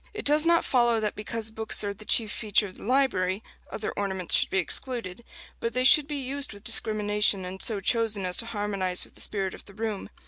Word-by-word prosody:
It 425 - -6
does 300 +3 +4
not 335 0 +3
follow 240 -3 +2
that 210 -1 -3
because 220 +1 -2
books 220 -1 -1
are 200 0 -3
the 215 +2 -12
chief 220 -1 +5
feature 210 -1 +1
of 190 - -11
the - - -13
library, 215 -6 0 0.3
other 215 - -4
ornaments 190 -3 -2
should - - +4
be - - -1
excluded; 230 +1 -3 0.4
but 230 - -3
they 255 - 0
should 285 +2 +6
be 300 - -5
used 275 -1 -3
with 200 0 -15
discrimination, 210 -4 +2
and 185 +1 -7
so 215 -3 +3
chosen 220 -2 0
as 180 0 +2
to 230 - +4
harmonize 200 -4 -1
with - - -15
the - - -11
spirit 195 -3 -3
of - - -11
the 200 - -16
room. 215 -2 -5
215 Hz, 220 wpm, -26 LUFS, 200-235 Hz, 0.4 s, should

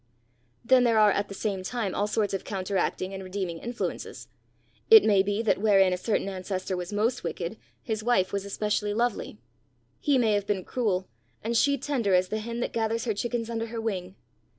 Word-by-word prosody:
Then 255 +1 +5
there 230 -2 +3
are 210 -1 +6
at 200 +1 0
the 195 - -8
same 200 -3 -2
time 205 0 -3
all 205 - 0
sorts 210 -1 0
of 195 - -2
counteracting 190 -1 -2
and 190 0 -6
redeeming 185 -3 -4
influences. 240 +5 -5 0.6
It 445 -2 +10
may 200 -3 +4
be 205 +3 -1
that 220 - +2
wherein 195 -3 +4
a - - -1
certain 205 +1 -1
ancestor 190 0 -3
was 180 +1 -5
most 225 +4 0
wicked, 175 +4 -4 0.3
his 220 -2 -3
wife 220 -6 +2
was 200 -1 -1
especially 210 +1 -1
lovely. 235 - -1 0.6
He 285 -2 +2
may 225 -4 +3
have 205 -1 0
been 190 -3 -1
cruel, 200 -7 -1 0.4
and 230 +2 -1
she 280 +4 +3
tender 250 -8 0
as 180 0 +2
the 215 - -2
hen 235 +2 -4
that - - -2
gathers 225 +1 -1
her 225 - 0
chickens 230 +2 -2
under 230 -1 -3
her 230 0 -5
wing. 190 -4 -3
210 Hz, 195 wpm, -27 LUFS, 190-230 Hz, 0.6 s, It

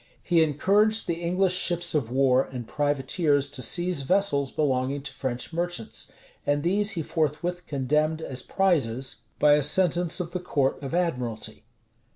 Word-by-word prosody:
[] - - -36
He 165 - +6
encouraged 200 +9 +2
the 170 -1 -3
English 180 +2 +1
ships 175 -2 +1
of 140 -7 0
war 130 0 +3
and 125 -3 -7
privateers 145 - 0
to 135 - -6
seize 175 +3 0
vessels 140 -4 +1
belonging 135 -1 0
to 140 - -7
French 125 +4 -4
merchants; 170 -9 -3 0.4
and 145 0 0
these 200 +4 +1
he 165 - -1
forthwith 170 +3 -2
condemned 150 +3 0
as 130 -5 -5
prizes, 135 -11 0 0.2
by 150 -1 +5
a 150 - +4
sentence 175 +3 +2
of 175 -1 -4
the 180 - -3
court 145 -7 0
of 140 +3 -4
admiralty. 125 -11 -3
150 Hz, 160 wpm, -26 LUFS, 135-175 Hz, 0.4 s, He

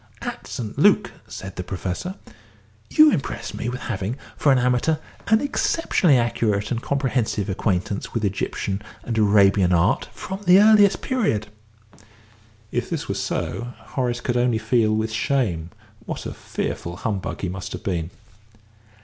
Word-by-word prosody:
"At - - -5
St. 110 -4 -5
Luc," - - +4 0.2
said 95 -1 -8
the 90 - -3
Professor, 95 - -4 0.7
"you 310 -1 +7
impressed 120 - -3
me 120 - -3
as 125 - -6
having, 105 0 -3 0.2
for 145 - +3
an 135 - +5
amateur, 125 +5 +2 0.3
an 220 0 +4
exceptionally 245 - +2
accurate 110 -3 0
and 120 -1 -1
comprehensive 125 -8 -1
acquaintance 95 0 -1
with 115 -2 -1
Egyptian 100 0 -2 0.2
and 115 - -3
Arabian 100 -3 +4
art 90 +4 +2
from 190 +1 -6
the 180 +2 +7
earliest 210 -1 +6
period." 200 - 0 1.2
(If - - -2
this - - -3
were - - -1
so, 95 +9 -3 0.2
Horace 120 -2 -1
could 120 -1 -1
only 120 -2 +2
feel 110 0 +2
with 110 +1 -1
shame 110 - 0 0.4
what - - -5
a - - -4
fearful 85 +1 -4
humbug 100 -1 -3
he 95 - -1
must 90 0 -6
have 90 - -7
been.) 85 -4 -2
115 Hz, 150 wpm, -23 LUFS, 95-130 Hz, 1.2 s, you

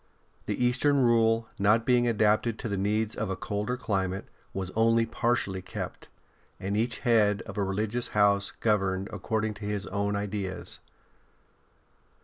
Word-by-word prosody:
The 125 - 0
Eastern 140 +4 +3
Rule, 115 -1 +3
not 110 +3 +3
being 120 -1 +3
adapted 110 0 +2
to - - -4
the 100 - -2
needs 105 +3 0
of 105 -2 -3
a 95 - -1
colder 105 +6 -3
climate, 95 -5 -2 0.3
was 95 -1 -4
only 115 +1 +3
partially 115 -5 -1
kept, 90 - -7 0.5
and 100 +2 -2
each 115 +2 0
head 105 -5 +3
of - - -9
a 100 - 0
religious 105 +5 -1
house 100 -1 +4
governed 95 -3 0
according 110 +2 -1
to - - -5
his 105 -1 -2
own 100 0 -1
ideas. 100 -2 -4
105 Hz, 145 wpm, -28 LUFS, 100-115 Hz, 0.5 s, house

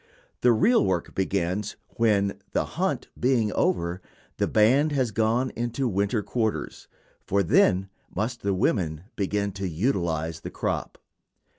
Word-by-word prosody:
The 125 - +5
real 225 - +4
work 95 -3 -1
begins 95 +1 -1
when, 100 -4 +1
the - - +1
hunt - - -2
being 120 -4 +2
over, 85 +1 0 0.4
the - - +1
band 130 +8 +4
has 130 -5 +1
gone 115 +4 +1
into 120 +3 -2
winter 100 +1 0
quarters, 110 -1 -2 0.4
for 100 +1 +1
then 95 +2 +3 0.2
must 115 +4 -3
the 100 -1 0
women 80 -4 0
begin 100 0 -1
to 95 -1 -4
utilize 85 - -1
"the - - -7
crop." - - -3
100 Hz, 135 wpm, -26 LUFS, 95-115 Hz, 0.4 s, The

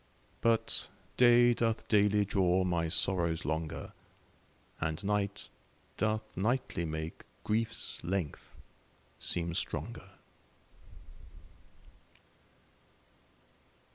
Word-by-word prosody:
But 115 -1 +1 0.3
day 120 0 +6
doth 115 -1 -1
daily 105 -1 +4
draw 95 -2 +2
my 85 -2 0
sorrows 85 -1 +1
longer, 80 +1 -3 0.9
And 80 +3 -2
night 100 0 -1 0.5
doth 110 0 -1
nightly 110 -3 0
make 80 0 -5 0.2
grief's 115 +1 -2
length 90 -3 -3 0.6
seem 85 -1 0
stronger. - - -3
95 Hz, 75 wpm, -32 LUFS, 85-110 Hz, 0.9 s, day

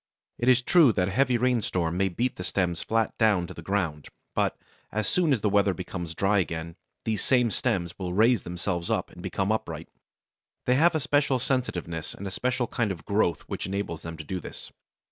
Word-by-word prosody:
It 120 - +2
is 130 0 +5
true 160 -3 +6
that 90 -1 +1
a - - -4
heavy 125 +3 +3
rainstorm 110 -9 +1
may 95 +1 +2
beat 120 +8 -1
the 90 - -5
stems 90 -3 0
flat 115 0 0
down 105 -6 +4
to - - -8
the - - -9
ground, 85 -5 -2 0.3
but, - - 0 0.3
as 110 0 -1
soon 175 -4 +2
as 125 -6 +2
the 105 - +2
weather 100 -1 +3
becomes 85 -2 -5
dry 100 +3 +3
again 85 -1 -3 0.3
these 110 -3 0
same 125 -3 +3
stems 85 -2 -1
will 90 -2 -3
raise 110 +3 +4
themselves 85 0 -3
up - - -1
and - - -12
become 95 +2 -1
upright; 110 - -3 0.8
they 125 - +4
have 160 +6 +4
a - - +2
special 145 -2 +2
sensitiveness 90 - -2
and 100 - -8
a 95 - -4
special 125 +4 0
kind 110 -2 -1
of 80 -5 -7
growth 100 -4 +1
which - - -5
enables 95 -4 -3
them 85 -1 -7
to 80 - -6
do 90 +4 -4
this. - - -9
100 Hz, 205 wpm, -27 LUFS, 85-120 Hz, 0.8 s, true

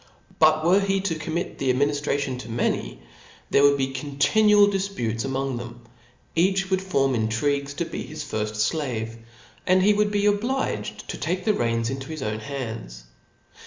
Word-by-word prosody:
But 155 0 +4
were 190 +4 +4
}ie 195 0 +1
to 190 -3 -1
commit 160 +3 -4
the 135 -2 +2
adminiftration 140 -1 0
to 125 - -9
many, - - -2 0.5
there - - +5
would 140 0 +5
be 135 -1 -1
continual 150 +10 +4
difputes 190 - -2
among 135 -1 -2
them; 120 0 -8 0.5
each 190 +3 +2
would 190 0 +2
form 135 -8 +1
intrigues 140 +5 0
to 170 - -1
be - - -5
his 155 0 -6
firft 105 -6 -1
flave 115 -7 -3 0.2
\ - - -26
and 185 0 +4
he 210 +2 +5
would 210 0 +2
be 205 0 0
obliged 230 +6 -1
to - - -5
take 180 +1 -2
the 215 - +3
reins 115 - 0
into 135 0 -5
his 155 -3 -5
own 110 0 -2
bands. 110 - -6
140 Hz, 170 wpm, -24 LUFS, 120-185 Hz, 0.5 s, there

